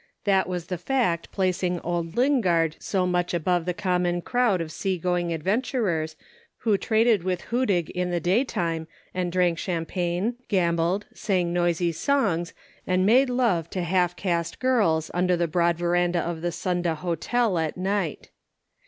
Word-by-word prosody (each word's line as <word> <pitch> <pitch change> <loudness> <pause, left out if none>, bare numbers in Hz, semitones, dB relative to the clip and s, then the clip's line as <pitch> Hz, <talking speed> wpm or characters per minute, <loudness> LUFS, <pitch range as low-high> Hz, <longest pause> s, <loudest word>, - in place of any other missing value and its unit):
That 195 -2 +2
was 180 -2 -3
the 180 -1 -4
fact 180 -7 0
placing 180 -2 0
old 170 -1 -3
Lingard 185 - +2
so 190 -2 0
much 180 -1 0
above 175 0 0
the 180 - -1
common 180 -3 0
crowd 245 -6 +2
of 165 -2 -4
sea 190 +2 -2
going 175 0 -1
adventurers 175 - -1 0.4
who 220 -3 +1
traded 220 -1 +2
with 180 -1 -1
Hudig 205 -9 +1
in 180 0 -2
the 175 -1 0
daytime 175 -5 0 0.3
and 180 -1 -2
drank 175 -2 +1
champagne, 180 +5 -2
gambled, 175 0 +1
sang 180 -4 0
noisy 175 -1 +1
songs, 175 - 0 0.4
and 185 0 +2
made 255 +6 +5
love 225 -10 +1
to 185 - -3
half 180 0 +1
caste 170 -3 -2
girls 205 -12 +1
under 180 0 +2
the 170 - +1
broad 170 +1 +1
verandah 175 0 +1
of 165 -1 -4
the 175 0 -1
Sunda 175 -1 -1
Hotel 180 +5 0
at 160 +1 -2
night. 190 -3 -2
180 Hz, 155 wpm, -25 LUFS, 170-195 Hz, 0.4 s, made